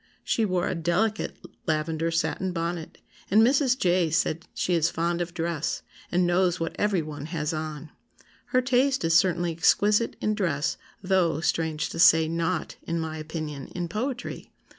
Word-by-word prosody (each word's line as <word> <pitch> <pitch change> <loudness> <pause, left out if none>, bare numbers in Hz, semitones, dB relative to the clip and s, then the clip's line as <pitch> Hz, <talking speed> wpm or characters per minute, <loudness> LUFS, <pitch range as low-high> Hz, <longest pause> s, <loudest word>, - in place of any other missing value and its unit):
She 225 - +1
wore 185 -3 0
a - - -1
delicate 185 +6 0 0.3
lavender 160 +1 0
satin 175 +3 -1
bonnet; 170 -1 -4 0.3
and 215 +3 +6
Mrs. 260 +1 +3
J. 175 -5 +2
says 155 0 +1 0.2
she 180 - 0
is 165 -1 +3
fond 170 +1 -1
of 175 0 -3
dress, 165 -2 -2 0.3
and 180 0 +2
knows 175 0 +2
what 165 0 -3
every 200 -5 +1
one 150 -1 -7
has 160 -1 -2
on. 155 -1 -5 0.5
Her 255 -1 +1
taste 260 0 +2
is 165 0 +3
certainly 175 -1 +3
exquisite 205 +7 +3
in 215 - 0
dress 170 -7 0 0.3
though 185 -4 +2
(strange 160 -2 -1
to - - -6
say) 160 -2 +6
not, 165 +2 -2
in 170 0 -3
my 160 -1 -4
opinion, 155 -3 -5
in 175 -1 -2
poetry. 245 +7 -4
170 Hz, 160 wpm, -26 LUFS, 160-190 Hz, 0.5 s, and